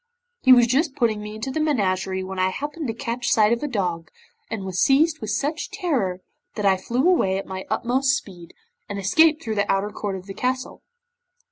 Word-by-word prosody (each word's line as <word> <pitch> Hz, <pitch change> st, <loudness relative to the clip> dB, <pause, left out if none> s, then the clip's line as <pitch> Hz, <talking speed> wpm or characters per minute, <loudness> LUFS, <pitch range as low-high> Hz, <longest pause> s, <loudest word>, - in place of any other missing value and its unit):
He 260 Hz, -, +5 dB
was 245 Hz, -2 st, +8 dB
just 270 Hz, +4 st, +1 dB
putting 225 Hz, -6 st, +1 dB
me 210 Hz, 0 st, -7 dB
into 220 Hz, +5 st, -4 dB
the 315 Hz, -, -2 dB
menagerie 190 Hz, -10 st, 0 dB
when 190 Hz, 0 st, -6 dB
I 185 Hz, 0 st, +3 dB
happened 290 Hz, -, -5 dB
to 225 Hz, -, -2 dB
catch 240 Hz, -1 st, -3 dB
sight 215 Hz, 0 st, +4 dB
of 235 Hz, -, -2 dB
a 295 Hz, -, -2 dB
dog, 180 Hz, -, -2 dB, 0.4 s
and 225 Hz, -3 st, -4 dB
was 185 Hz, -1 st, -3 dB
seized 310 Hz, +4 st, +3 dB
with 215 Hz, -, -5 dB
such 285 Hz, +9 st, -2 dB
terror 265 Hz, -, -1 dB, 0.3 s
that 210 Hz, -, -2 dB
I 195 Hz, -1 st, +5 dB
fled 240 Hz, -, -1 dB
away 255 Hz, -, +3 dB
at 195 Hz, -, -4 dB
my 190 Hz, 0 st, -6 dB
utmost 265 Hz, +2 st, +1 dB
speed, 175 Hz, -9 st, -11 dB, 0.3 s
and 205 Hz, -, -4 dB
escaped 310 Hz, -, +3 dB
through 220 Hz, -, -2 dB
the 205 Hz, -1 st, 0 dB
outer 195 Hz, +2 st, 0 dB
court 205 Hz, -2 st, -4 dB
of 185 Hz, -1 st, -8 dB
the 195 Hz, -, -7 dB
castle. 255 Hz, +4 st, -3 dB
220 Hz, 210 wpm, -23 LUFS, 190-270 Hz, 0.4 s, was